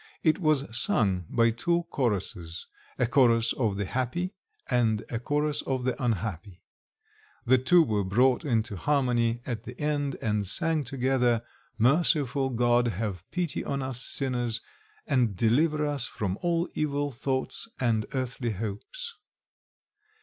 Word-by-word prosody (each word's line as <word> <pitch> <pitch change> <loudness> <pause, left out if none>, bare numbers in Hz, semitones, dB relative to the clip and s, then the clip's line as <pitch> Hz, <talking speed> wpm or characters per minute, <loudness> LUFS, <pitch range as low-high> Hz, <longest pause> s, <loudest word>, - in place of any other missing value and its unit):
It 155 +1 +3
was 155 -5 +2
sung 95 -7 +4
by 115 -1 +3
two 170 +9 0
choruses 95 -8 -2 0.3
a 125 - +2
chorus 115 -2 +3
of 110 -6 -1
the 100 - -1
happy 130 - -2 0.3
and 115 -3 +1
a 115 - -2
chorus 150 +3 0
of 130 -2 -2
the 130 +1 -2
unhappy. 100 -5 -3 0.8
The 130 +2 +5
two 165 +7 +5
were 105 -8 0
brought 125 - +3
into 115 -7 0
harmony 120 - +1
at 115 -4 -3
the 125 +1 -10
end, 145 -2 -1
and 105 -2 -1
sang 155 - +2
together, 125 -3 +1 0.3
"Merciful 135 +1 +2
God, 120 0 +2
have 100 -4 -4
pity 175 -6 -2
on 140 -1 -2
us 130 -2 -4
sinners, 120 -4 -2 0.4
and 125 -7 +1
deliver 150 - +2
us 145 -4 -1
from 100 -2 -3
all 170 0 +1
evil 145 -1 -1
thoughts 130 - -2
and 115 -4 +1
earthly 125 -2 -2
hopes." 115 - -5
125 Hz, 135 wpm, -28 LUFS, 115-140 Hz, 0.8 s, The